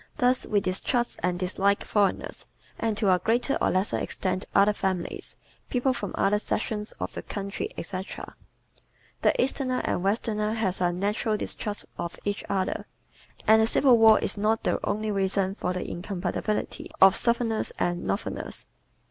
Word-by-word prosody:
Thus 250 Hz, -2 st, +2 dB
we 205 Hz, -2 st, +2 dB
distrust 240 Hz, +6 st, -1 dB
and 180 Hz, 0 st, 0 dB
dislike 195 Hz, +2 st, +1 dB
foreigners, 200 Hz, -3 st, 0 dB, 0.3 s
and 225 Hz, -2 st, 0 dB
to 200 Hz, -4 st, +4 dB
a 180 Hz, -, +2 dB
greater 240 Hz, -, +1 dB
or -, -, +3 dB
lesser 185 Hz, +2 st, +1 dB
extent 185 Hz, 0 st, -2 dB
other 200 Hz, +1 st, +6 dB
families, 185 Hz, -3 st, -3 dB, 0.3 s
people 255 Hz, +1 st, +1 dB
from 205 Hz, -6 st, -5 dB
other 205 Hz, +1 st, +2 dB
sections 210 Hz, 0 st, -2 dB
of -, -, -5 dB
the -, -, -4 dB
country, 200 Hz, -1 st, -4 dB
etc. 185 Hz, +3 st, -6 dB, 0.9 s
The -, -, +3 dB
Easterner 255 Hz, 0 st, 0 dB
and -, -, 0 dB
Westerner 210 Hz, +1 st, 0 dB
have 195 Hz, -5 st, -1 dB
a 175 Hz, -1 st, +3 dB
natural 205 Hz, +4 st, 0 dB
distrust 205 Hz, 0 st, -4 dB
of 170 Hz, -, -4 dB
each 205 Hz, 0 st, -1 dB
other; 190 Hz, -2 st, -1 dB, 0.6 s
and 220 Hz, +1 st, +6 dB
the 220 Hz, -, +3 dB
Civil 245 Hz, 0 st, +5 dB
War 220 Hz, -1 st, +8 dB
is -, -, -2 dB
not 220 Hz, +2 st, +1 dB
the -, -, +1 dB
only 215 Hz, +1 st, -1 dB
reason 195 Hz, -1 st, 0 dB
for 180 Hz, -, -2 dB
the 180 Hz, 0 st, -3 dB
incompatibility 185 Hz, +3 st, -3 dB
of 190 Hz, 0 st, +8 dB
Southerners 235 Hz, -2 st, +1 dB
and 175 Hz, 0 st, 0 dB
Northerners. 200 Hz, -, -3 dB
205 Hz, 155 wpm, -27 LUFS, 190-225 Hz, 0.9 s, War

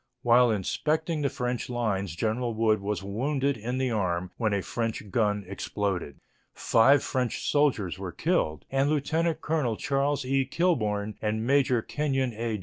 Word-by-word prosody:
While 120 Hz, 0 st, +5 dB
inspecting 155 Hz, -, -1 dB
the 140 Hz, -, +1 dB
French 125 Hz, -3 st, -3 dB
lines 100 Hz, -8 st, -1 dB
General 115 Hz, +4 st, -1 dB
Wood 110 Hz, -2 st, +2 dB
was 100 Hz, 0 st, -3 dB
wounded 135 Hz, +7 st, -1 dB
in 120 Hz, +4 st, -4 dB
the 130 Hz, -1 st, 0 dB
arm 90 Hz, -4 st, -1 dB
when 110 Hz, -3 st, 0 dB
a 100 Hz, -2 st, 0 dB
French 115 Hz, -3 st, -3 dB
gun 105 Hz, -2 st, +1 dB
exploded. 95 Hz, -5 st, -3 dB, 0.4 s
Five 135 Hz, +5 st, +4 dB
French 125 Hz, -2 st, -2 dB
soldiers 125 Hz, -, +1 dB
were 95 Hz, -2 st, -5 dB
killed 75 Hz, -1 st, -1 dB
and 135 Hz, +1 st, +2 dB
Lieutenant 160 Hz, +3 st, 0 dB
Colonel 145 Hz, -9 st, 0 dB
Charles 140 Hz, 0 st, 0 dB
E. 135 Hz, +1 st, +2 dB
Kilbourne 110 Hz, -, 0 dB
and 110 Hz, +1 st, -1 dB
Major 130 Hz, -3 st, +3 dB
Kenyon 135 Hz, -4 st, -1 dB
A. 115 Hz, -1 st, -2 dB
120 Hz, 150 wpm, -27 LUFS, 105-135 Hz, 0.4 s, While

